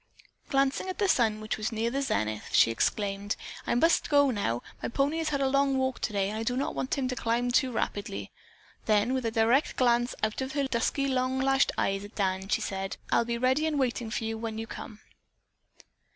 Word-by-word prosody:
Glancing 275 +6 +1
at 370 - -4
the 400 - +2
sun, 220 - +2
which 215 0 -3
was 215 - -2
nearing 230 +2 -1
the 275 - 0
zenith, 110 - -1
she 115 - +6
exclaimed: 200 - -1 0.3
"I - - +1
must 330 +8 +3
go 285 -2 +5
now; 120 - -1 0.2
my - - -2
pony 280 +6 0
has 320 -1 -1
had 280 -2 -1
a 270 - +3
long 275 0 +2
walk 260 -1 -1
today 200 -2 -1
and 215 +1 -4
I - - -2
do 245 +2 -1
not 275 - -1
want 260 - -2
him 265 -2 0
to 255 - -2
climb 240 +1 0
too 255 +1 +2
rapidly." 150 - -3 0.6
Then 215 +3 +3
with 260 -3 -1
a - - +2
direct 230 +5 +2
glance 240 -1 +2
out 215 +3 0
of 265 0 -4
her 285 -1 0
dusky, 265 +3 0
long 260 0 0
lashed 270 0 +3
eyes 195 0 0
at 205 - -11
Dan, 190 -1 -1
she - - +1
said: 195 0 -3
"I'll 235 - +3
be 235 0 -2
ready 260 +6 +2
and 305 -2 -1
waiting 245 -3 -1
for 220 - -3
you 225 0 -3
when 225 -1 -4
you 225 - -4
come." 220 -1 -9
235 Hz, 220 wpm, -28 LUFS, 215-270 Hz, 0.6 s, she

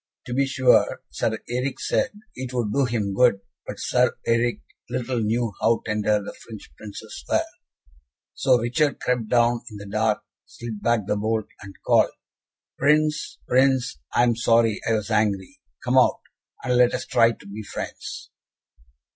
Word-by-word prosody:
To 120 - -5
be 135 +2 +2
sure, 130 -2 +3
Sir 110 - -1
Eric 125 +3 -2
said - - +1 0.2
it 130 -1 -6
would 110 -4 -1
do 140 -1 +3
him 110 -5 -1
good, 120 -2 +4 0.3
but - - -6
Sir 125 -1 +1
Eric 115 +1 +1 0.3
little 125 0 -2
knew 115 0 0
how 115 0 +2
tender 105 -1 +1
the 100 - -7
French 110 -3 -12
Princes 105 - -9
were. - - +2 0.9
So 130 -2 +3
Richard 130 +6 0
crept 125 -3 -1
down 120 0 +3
in 105 - -9
the 100 - -9
dark, 110 +1 0 0.2
slid 115 -3 -8
back 120 -2 +2
the 105 - 0
bolt, 110 +1 0 0.2
and 100 +1 -10
called, - - +4 0.7
"Prince, 150 +2 +2
Prince, 130 - +2 0.2
I 120 - +5
am 120 -1 +3
sorry 115 -2 +3
I - - +3
was 110 0 -2
angry. 105 -3 0 0.2
Come - - +4
out, - - +3 0.4
and 125 -1 +1
let 125 0 +4
us - - -4
try 115 0 +4
to 100 - -17
be 105 +2 -7
friends." 105 - -7
115 Hz, 165 wpm, -24 LUFS, 105-125 Hz, 0.9 s, I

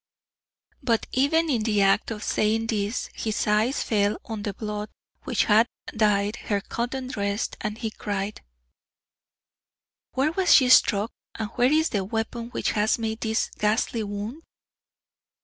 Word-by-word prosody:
But 235 -4 +1
even 320 +5 +2
in 250 -7 +1
the 210 -2 +2
act 195 +1 +3
of 220 -1 -5
saying 220 +1 +1
this 215 0 -2
his 220 -2 -2
eyes 215 +6 +2
fell 205 -1 +1
on 220 -2 -5
the 205 - -2
blood 210 0 -4 0.4
which - - +1
had 220 +2 +4 0.3
dyed 210 -1 +2
her 205 -2 -1
cotton 245 +5 -4
dress 205 -5 -2
and 215 0 -3
he 225 -2 -3
cried: 205 0 -4 1.7
"Where 270 +4 +1
was 365 +1 +4
she 255 -3 +5
struck 210 -3 +5 0.3
and 220 -1 -4
where 245 +3 +2
is 315 +1 +3
the 200 -4 -1
weapon 225 +3 -3
which - - -1
has 215 +2 +2
made 220 -1 -3
this 220 -1 0
ghastly 220 +2 +1
wound?" 210 +7 -5
220 Hz, 150 wpm, -25 LUFS, 210-240 Hz, 1.7 s, she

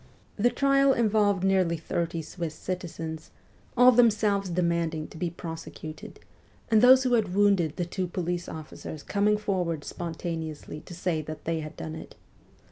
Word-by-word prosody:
The 230 +4 +3
trial 275 +2 +3
involved 210 -5 +2
nearly 185 -3 +2
thirty 165 +1 -2
Swiss 160 0 -5
citizens, 165 -3 -5 0.5
all 250 +1 +8
themselves 210 -5 +3
demanding 170 -2 0
to - - -12
be 175 - -1
prosecuted, 160 -2 -8 0.5
and 220 -1 +6
those 260 +2 +8
who 255 -1 +1
had 205 -6 +1
wounded 195 -6 +3
the 175 - -2
two 180 +1 -3
police 175 0 -3
officers 155 -1 -8
coming 210 +1 +2
forward 180 -7 -1
spontaneously 160 -3 -5
to 175 - -8
say 170 -2 -1
that 155 +1 -8
they 165 0 -1
had 155 -1 -7
done 160 - -5
it. 160 - -9
175 Hz, 150 wpm, -27 LUFS, 160-205 Hz, 0.5 s, all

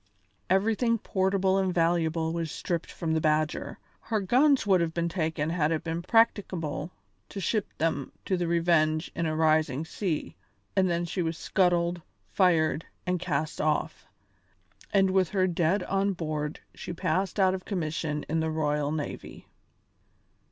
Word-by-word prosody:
Everything 225 +5 +2
portable 190 -1 +1
and 190 -1 +1
valuable 165 -1 +1
was 165 -1 -2
stripped 170 +2 -3
from 160 -2 -2
the 160 - +1
Badger 155 0 0 0.2
her 220 -2 -1
guns 260 +8 +3
would 190 -3 +4
have 165 -1 -2
been 170 0 0
taken 160 -3 -1
had 160 -3 +1
it 160 - -1
been 165 0 -3
practicable 185 -7 +1 0.4
to 200 - -6
ship 210 +2 0
them 155 -4 -1
to 190 - +1
the 175 -1 -1
Revenge 165 -1 +2
in 165 0 -1
a 155 - -1
rising 155 -2 +2
sea 165 -1 -3 0.4
and 190 -2 +3
then 170 0 0
she 180 +2 -2
was 165 -1 -2
scuttled, 175 -1 +1 0.3
fired, 160 - +2 0.2
and 180 -1 0
cast 155 -3 -2
off, 155 0 -1 0.8
and 195 -2 +3
with 185 -2 +2
her 190 -3 +2
dead 180 +2 +1
on 195 +1 0
board 155 -3 -4
she - - -7
passed 190 +3 -1
out 190 -1 +4
of 185 -1 -4
commission 155 -5 -3
in 160 +1 0
the 160 0 0
royal 150 -2 0
navy. 155 -2 -5
170 Hz, 155 wpm, -28 LUFS, 155-190 Hz, 0.8 s, would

